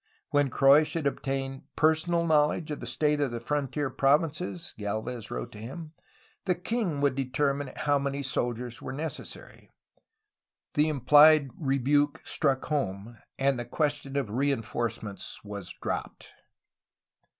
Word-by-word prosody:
When 145 -2 +3
Croix 135 +4 +6
should 155 0 -3
obtain 135 -1 -2
personal 160 +2 +2
knowledge 155 0 +2
of 150 - -4
the - - -7
state 150 -1 +1
of 140 - +1
the 120 0 -4
frontier 140 +2 -2
provinces, 160 +4 0
Gdlvez 110 +3 -4
wrote - - -5
to 105 - -11
him, 155 +8 -8 0.5
the 180 -2 +2
king 180 -5 -2
would 140 -1 +3
determine 140 +1 -1
how 145 -2 +1
many 140 0 -2
soldiers 120 -2 -2
were 130 - -5
necessary. 155 +3 -7 1.0
The 150 +1 +3
implied 150 +1 +6
rebuke 145 0 +1
struck 135 -1 +1
home, 115 -6 -3 0.2
and 135 -1 +1
the 120 - -4
question 145 +1 -1
of 130 -7 -1
reinforcements 115 -5 -2
was 100 -4 -7
dropped. - - -5
140 Hz, 130 wpm, -28 LUFS, 125-150 Hz, 1.0 s, Croix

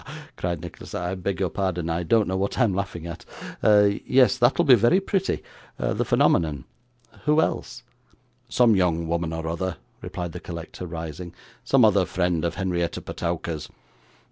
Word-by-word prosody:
cried 85 -2 -3
Nicholas. 85 -1 -9
'I 90 +1 -2
beg 95 -1 -3
your 95 -2 0
pardon, 90 -4 -2
I 85 +1 -1
don't 105 +6 +2
know 95 - -1
what 95 +1 -1
I'm 115 -6 +3
laughing 90 -3 -4
at 85 -1 -7 0.4
yes, 105 +5 +4
that'll 135 +8 +3
be 135 - +7
very 120 - +5
pretty 195 -1 -1 0.3
the - - 0
phenomenon 75 -6 +2 0.6
who 150 +1 +4
else?' - - -1 0.7
'Some 120 -3 +4
young 85 -3 +1
woman 85 0 -1
or 80 0 -4
other,' 85 +2 -3 0.2
replied 85 -1 -5
the - - -7
collector, 85 +1 -7
rising; 85 +1 -7 0.3
'some 135 -4 +5
other 100 -3 +3
friend 90 -3 0
of 85 - -1
Henrietta 90 -3 -1
Petowker's. 85 -2 -4
90 Hz, 155 wpm, -24 LUFS, 85-105 Hz, 0.7 s, be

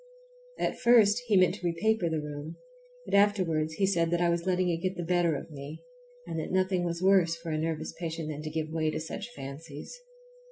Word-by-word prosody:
At - - -1
first 235 -3 +5
he 210 -3 +4
meant 185 -1 +5
to - - -18
repaper 180 +2 +1
the 160 -1 -1
room, 150 +2 -6 0.5
but - - -8
afterwards 185 -6 +3
he 195 - +2
said 170 -4 +2
that 175 0 +1
I 175 -1 +3
was 170 +1 -1
letting 185 -1 +2
it 170 - +1
get 185 +1 -1
the 175 - -3
better 175 -2 +2
of 150 - -7
me, 145 +2 -8 0.4
and 160 - -4
that - - -4
nothing 185 -1 +1
was 170 0 -2
worse 185 -4 +4
for 165 0 -6
a 155 - 0
nervous 160 -1 -3
patient 165 -2 -4
than 150 -1 -5
to 155 - -5
give 155 0 -3
way 160 -1 0
to 155 - -2
such 195 +8 -6
fancies. 145 - -8
170 Hz, 215 wpm, -29 LUFS, 155-185 Hz, 0.5 s, first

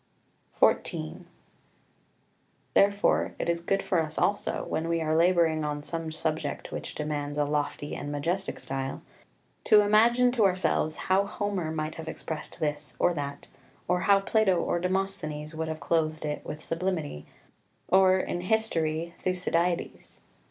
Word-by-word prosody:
[Footnote - - +4
2: - - -6
Opp. - - -2
29.] 80 0 -7
XIV - - -14 1.5
Therefore 200 +1 +3
it - - -3
is 170 0 +1
good 195 +3 0
for 180 - +1
us 155 -1 -3
also, 205 +1 0
when 160 - -2
we 170 0 +1
are 155 -1 0
labouring 165 -2 +3
on 145 -1 -3
some 165 0 -4
subject 155 -2 -3
which - - -6
demands 150 -1 -3
a 145 - +2
lofty 145 0 -2
and 145 - -5
majestic 170 +7 -2
style, 135 0 -4 0.6
to 210 - +7
imagine 235 +4 +4
to 240 -3 +2
ourselves 180 -4 +2
how 195 +2 +1
Homer 200 -6 -2
might 155 0 -3
have 160 - -10
expressed 155 -1 -6
this 150 -1 -3
or 175 - +3
that, 140 -2 -5 0.4
or 180 0 +2
how 200 0 +7
Plato 195 -1 +2
or 175 - 0
Demosthenes 180 -5 -2
would 160 0 -3
have 160 0 -4
clothed 155 +1 0
it 150 0 -3
with 150 - -7
sublimity, 165 - -3 0.6
or, 190 0 +6
in 175 -1 -2
history, 170 -5 0
Thucydides. 180 -1 -1
165 Hz, 155 wpm, -28 LUFS, 150-190 Hz, 1.5 s, to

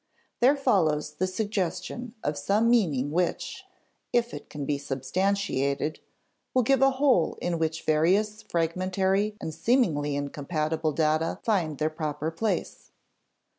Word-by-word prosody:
There 265 +4 +5
follows 160 - +2
the 185 +5 -1
suggestion 205 +4 -3
of 150 - -1
some 205 +11 +2
meaning 150 - +2
which, 175 +2 -2 0.5
if 240 0 +1
it - - -8
can 145 -2 -5
be 145 0 -1
substantiated, 145 +1 -1 0.6
will 255 - +4
give 270 +3 +3
a 270 - +7
whole 265 - +2
in 170 -2 -1
which 160 0 -1
various 195 +8 +2
fragmentary 190 +5 0
and 160 - -5
seemingly 155 - +1
incompatible 155 +2 -2
data 155 +1 +1
find 175 -9 0
their 155 +1 0
proper 155 0 -3
place. 210 +7 -3
170 Hz, 130 wpm, -27 LUFS, 150-210 Hz, 0.6 s, a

